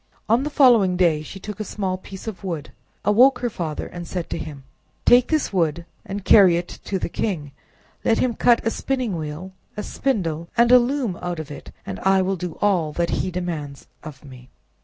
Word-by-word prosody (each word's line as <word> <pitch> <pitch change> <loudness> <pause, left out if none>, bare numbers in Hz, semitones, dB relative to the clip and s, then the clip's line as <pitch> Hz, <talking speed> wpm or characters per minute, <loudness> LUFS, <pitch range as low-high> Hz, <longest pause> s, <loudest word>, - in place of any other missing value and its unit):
On 230 +3 +3
the 295 - -2
following 235 -11 +5
day 165 -4 +3
she 175 +5 -9
took 210 +3 -8
a - - -1
small 195 -2 -3
piece 190 0 -10
of 210 -4 -7
wood, 170 -6 -4 0.3
awoke 245 +7 +5
her 240 -1 -2
father, 160 -6 -4
and 175 -1 -8
said 180 -1 -5
to - - -2
him— 145 -4 -8 0.4
"Take 245 0 +6
this 310 -9 0
wood, 170 -2 0 0.2
and 195 -1 -6
carry 185 -5 +7
it 175 0 -4 0.2
to 195 - -1
the - - -2
king; 165 -6 -3 0.5
let 225 - +3
him 250 -2 +1
cut 235 +1 +3
a 225 - +2
spinning 255 -7 -2
wheel, 160 +4 -6 0.3
a 210 - -3
spindle, 170 - -2
and 235 +1 +5
a 250 - +9
loom 245 -6 -1
out 175 -1 -3
of 155 -2 -7
it, 145 - -9
and 95 - -6
I 190 0 +3
will 195 +1 0
do 175 -2 -6
all 180 -7 +2
that 170 +1 -1
he - - -2
demands 165 -6 -5 0.2
of 150 -2 -10
me." 125 -2 -13
185 Hz, 205 wpm, -22 LUFS, 165-225 Hz, 0.5 s, a